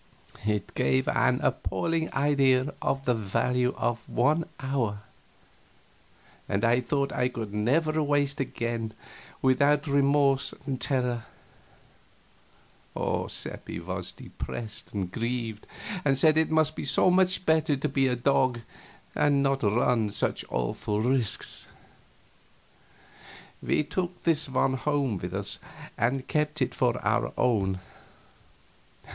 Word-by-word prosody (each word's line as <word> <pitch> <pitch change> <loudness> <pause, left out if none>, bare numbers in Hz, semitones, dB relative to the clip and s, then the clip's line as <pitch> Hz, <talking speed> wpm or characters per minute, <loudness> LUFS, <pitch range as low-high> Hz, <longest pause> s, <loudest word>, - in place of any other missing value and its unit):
It 105 -2 -1
gave 65 -1 +1
an - - +2
appalling 160 - -1
idea 135 -1 +2
of 135 0 -1
the 125 - +3
value 120 +4 0
of 120 0 -1
an 150 +7 +2
hour, 125 -7 -2 1.5
and 100 +3 +1
I 120 +2 +3
thought 140 +3 -1
I 125 0 +1
could 110 -5 -6
never 155 +9 +1
waste 145 0 +1
one 135 - 0
again 115 -1 -3 0.5
without 140 +3 +3
remorse 140 -1 +2
and 135 -3 -3
terror. 125 -4 0 2.0
Seppi - - -6
was - - -4
depressed 110 -3 -7
and 95 -3 -3
grieved, 115 -1 -3 0.4
and 135 -2 +2
said 155 +3 +5
it 160 0 +3
must 155 -1 +2
be - - -4
so 140 +6 +4
much 185 0 +3
better 160 -1 +3
to 135 - -1
be 135 0 +2
a 125 - +1
dog 125 -1 +2 0.5
and 140 -1 +3
not 135 0 +1
run 110 +1 +2
such - - -1
awful 60 - -1
risks. 120 -3 0 1.9
We - - +1
took 175 +3 -4
this 160 -3 +1
one 130 0 +2
home 140 -7 0
with 90 +2 -5
us 100 +1 -3 0.4
and 130 +3 0
kept 150 0 0
him 130 -2 +2
for 120 -1 +1
our - - +1
own. 95 -6 +1
130 Hz, 125 wpm, -27 LUFS, 115-145 Hz, 2.0 s, said